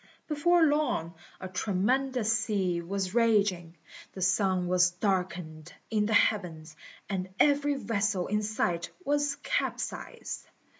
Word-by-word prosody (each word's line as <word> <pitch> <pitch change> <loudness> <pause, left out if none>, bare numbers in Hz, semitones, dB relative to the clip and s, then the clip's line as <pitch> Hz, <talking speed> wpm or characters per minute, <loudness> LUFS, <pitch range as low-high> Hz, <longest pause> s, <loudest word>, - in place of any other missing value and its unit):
Before 330 +3 +3
long 290 - +1 0.3
a 185 - -6
tremendous 220 +6 0
sea 195 -6 0
was 190 +2 -3
raging, 200 -7 +2 0.4
the 190 - -8
sun 185 0 +2
was 180 0 +4
darkened 180 -4 -3 0.2
in 210 -1 +1
the 220 - 0
heavens, 165 -8 +1 0.3
and 190 -2 -3
every 285 0 +3
vessel 210 -7 -1
in 210 +1 0
sight 180 -5 -1 0.2
was 290 0 +1
capsized. - - -3
200 Hz, 115 wpm, -29 LUFS, 180-235 Hz, 0.4 s, was